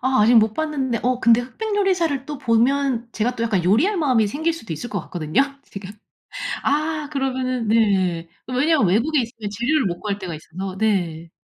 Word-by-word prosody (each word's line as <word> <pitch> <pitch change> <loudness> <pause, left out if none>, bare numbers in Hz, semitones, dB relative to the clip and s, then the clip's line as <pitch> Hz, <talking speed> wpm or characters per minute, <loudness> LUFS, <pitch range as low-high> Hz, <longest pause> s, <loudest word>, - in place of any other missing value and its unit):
아 260 -3 +2
아직 235 +3 +5
못 220 -1 +5
봤는데 275 -6 -1
어 250 0 0
근데 230 +1 +5
흑백 410 - -4
요리사를 340 -9 +1
또 295 -2 -6
보면 250 0 +1
제가 240 +3 -1
또 230 - -3
약간 215 -6 +1
요리할 275 - +3
마음이 255 -9 +2
생길 315 +10 -1
수도 225 - -7
있을 200 +11 -6
것 200 - -2
같거든요, 155 - -1 0.2
지금. 195 -1 -9 0.7
아! 305 0 0
그러면은 255 -3 -1
네. 190 -6 +2 0.2
왜냐하면 260 - +2
외국에 255 - +2
있으면 225 -3 -6
재료를 240 +6 +1
못 175 -2 -2
구할 205 -2 -3
때가 180 -4 -5
있어서 185 +5 -7
네. 175 -6 -1
240 Hz, 370 characters per minute, -22 LUFS, 205-280 Hz, 0.7 s, 아직